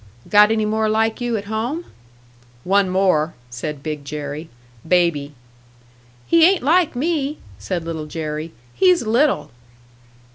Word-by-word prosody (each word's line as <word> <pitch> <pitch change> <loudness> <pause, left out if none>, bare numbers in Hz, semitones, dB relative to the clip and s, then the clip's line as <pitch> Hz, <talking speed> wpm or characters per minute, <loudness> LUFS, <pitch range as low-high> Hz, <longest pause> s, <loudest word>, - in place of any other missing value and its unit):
"Got 210 0 +6
any 220 -1 +1
more 220 0 0
like 220 +2 0
you 240 -2 0
at 200 - -6
home?" 235 +11 -3 0.8
"One 195 0 +2
more," 180 -4 +1 0.2
said 140 +3 -5
Big 150 -2 -4
Jerry. 150 +2 -6 0.4
"Baby." 160 -5 +1 0.9
"He 335 -1 +4
ain't 370 -1 +4
like 325 +1 +3
me," 295 +1 -1 0.2
said 165 - -4
Little 160 -2 -5
Jerry. 155 0 -5 0.2
"He's 365 -5 +3
little." 250 - +1
200 Hz, 130 wpm, -20 LUFS, 155-245 Hz, 0.9 s, Got